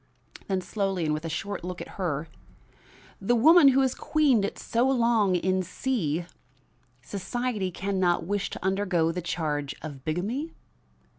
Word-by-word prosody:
Then 190 -2 0
slowly 195 -3 -1
and 155 - +1
with 155 +2 -3
a - - -2
short 200 +4 -4
look 180 0 -5
at - - -7
her: 165 -4 -1 0.9
"The 240 +5 +2
woman 310 +6 +7
who 270 0 +5
has 260 -1 +2
queened 285 -9 +2
it 200 - -3
so 240 +3 +1
long 230 -7 +3
in 185 +1 +1
C 175 - -2 0.8
society 210 +1 -2
can 195 +2 -3
not 175 -2 +2
wish 205 +2 -1
to - - -7
undergo 190 -4 +1
the 180 +2 -4
charge 150 -4 -2
of 145 -4 -8
bigamy?" 220 - -2
190 Hz, 155 wpm, -27 LUFS, 170-235 Hz, 0.9 s, woman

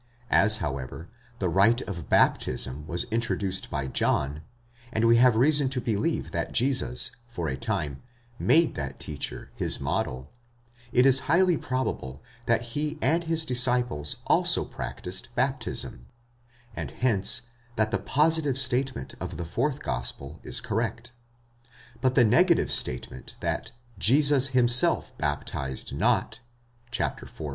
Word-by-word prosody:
As, 110 +2 +5
however, 70 +2 -5 0.3
the 95 - -1
rite 100 +8 +3
of 85 -6 -7
baptism 65 +4 +1
was 85 +2 -1
introduced 105 -5 -2
by 70 -2 -3
John, 70 +2 0 0.5
and 110 -1 0
we 115 0 +5
have 125 -1 +5
reason 140 +3 +3
to 130 -1 -2
believe 110 -3 -2
that - - -3
Jesus, 125 -1 0 0.2
for 90 -9 -5
a 65 - -2
time, 70 +1 -3 0.4
made 165 0 +3
that 70 -2 -6
teacher 75 -2 -5
his - - 0
model, 65 +2 -3 0.6
it 125 +1 +4
is 135 -1 +5
highly 175 +2 +4
probable 100 - -4 0.2
that 115 0 +2
he 150 +2 -2
and 165 +6 +1
his 165 -1 0
disciples 125 - +2
also - - +3
practised 95 +6 -5
baptism, 130 - -2 0.7
and - - -5
hence 115 -2 +2 0.3
that 110 -1 0
the - - 0
positive 150 -2 +1
statement 130 - +2
of - - -6
the 85 - -5
fourth 130 - -2
gospel 70 +5 -3
is 120 - 0
correct. 115 +1 -3 0.9
But 130 -1 +1
the 120 - +5
negative 170 - +3
statement 65 +1 0
that - - -3 0.3
Jesus 140 +5 +4
himself 125 -2 +3
baptised 65 -1 -3
not 110 +2 0 0.6
(iv. - - -2
115 Hz, 130 wpm, -26 LUFS, 80-130 Hz, 0.9 s, As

